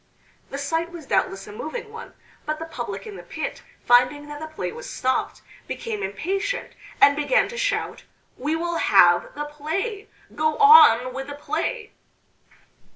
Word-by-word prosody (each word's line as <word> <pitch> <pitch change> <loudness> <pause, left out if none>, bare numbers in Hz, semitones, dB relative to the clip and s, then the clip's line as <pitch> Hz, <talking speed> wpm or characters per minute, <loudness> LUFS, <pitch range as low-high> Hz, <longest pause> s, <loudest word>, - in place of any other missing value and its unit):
The 275 - -5
sight 325 +4 -2
was 340 -4 -9
doubtless 195 -6 0
a 210 - -10
moving 370 - -6
one, 460 +1 -10 0.3
but 305 0 -1
the 325 - -6
public 325 - -6
in 420 -3 -8
the - - -8
pit, - - -6 0.2
finding 250 +5 +4
that 295 0 -7
the 315 - -6
play 310 - -5
was 485 +2 -9
stopped, 260 - -2 0.2
became 445 -3 -4
impatient, 390 - -3 0.3
and 285 - +6
began 300 +12 +2
to 480 - -8
shout - - -2 0.3
"We 295 +5 -2
will 340 +1 -2
have 175 - +4
the 295 0 -3
play 330 +9 -4 0.2
go 310 0 0
on 255 - +7
with 270 +1 -5
the 285 - -7
play!" 330 +10 -3
310 Hz, 160 wpm, -23 LUFS, 280-415 Hz, 0.3 s, on